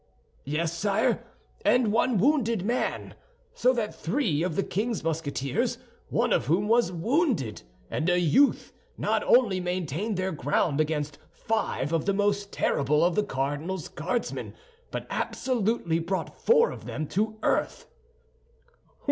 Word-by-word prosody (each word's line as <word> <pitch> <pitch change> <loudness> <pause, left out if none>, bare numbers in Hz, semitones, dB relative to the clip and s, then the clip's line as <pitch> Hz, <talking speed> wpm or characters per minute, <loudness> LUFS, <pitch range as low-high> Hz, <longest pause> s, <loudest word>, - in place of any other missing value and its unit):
"Yes, 160 +4 -1
sire, 200 +3 +1 0.4
and 240 -4 +3
one 235 0 +2
wounded 230 -4 +2
man; 240 +3 -1 0.4
so 250 - +3
that 225 -4 -2
three 170 - 0
of 175 -2 -1
the 195 - +1
king's 215 +2 -2
Musketeers—one 150 -4 -2
of - - +1
whom 180 +7 +2
was 230 -4 +3
wounded—and 160 - -1
a 180 0 +3
youth 175 - +3 0.2
not - - 0
only 230 -7 +4
maintained 180 +3 -2
their 185 0 -1
ground 145 0 +1
against 150 -2 -2
five 220 -9 -2
of 165 -2 +1
the 200 - +2
most 200 0 0
terrible 150 +4 +2
of 175 - +2
the 210 - +2
cardinal's 150 +2 -3
Guardsmen, - - -3 0.3
but - - -5
absolutely 225 -9 0
brought 180 +3 -3
four 470 0 +4
of - - -9
them 155 - -3
to 215 +3 -1
earth." - - 0
185 Hz, 130 wpm, -27 LUFS, 155-220 Hz, 0.4 s, only